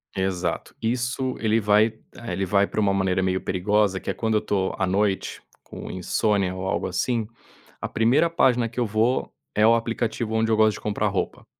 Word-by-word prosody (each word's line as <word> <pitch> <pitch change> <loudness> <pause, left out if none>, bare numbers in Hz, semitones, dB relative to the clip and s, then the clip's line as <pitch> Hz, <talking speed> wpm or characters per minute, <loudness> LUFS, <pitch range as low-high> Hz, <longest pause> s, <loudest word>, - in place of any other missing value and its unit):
Exato, 90 -3 -2
isso 125 +2 -1
ele 110 0 +2
vai 105 +1 +4
eh, 110 -1 -10
ele 95 +2 -1
vai 100 +2 +3
para - - -4
uma 100 -2 +2
maneira 95 -1 +1
meio 95 0 0
perigosa 100 +1 +1
que - - -7
é - - 0
quando 110 -1 -1
eu 105 - +2
tô 95 -2 -1
à 95 - 0
noite 100 +1 -1 0.2
com - - -9
insônia, 95 +1 0
ou 95 0 -5
algo 95 - -1
assim, 110 +4 -1 0.5
a - - -3
primeira 120 +9 +3
página 125 -7 +2
que 120 +2 -6
eu 120 - +2
vou 110 +4 0 0.2
é 105 +1 +4
o 115 - +6
aplicativo 115 -1 -2
onde 110 0 +1
eu - - +4
gosto 110 -1 +4
de - - -13
comprar 105 -1 -1
roupa. - - -3
105 Hz, 200 wpm, -24 LUFS, 95-115 Hz, 0.5 s, o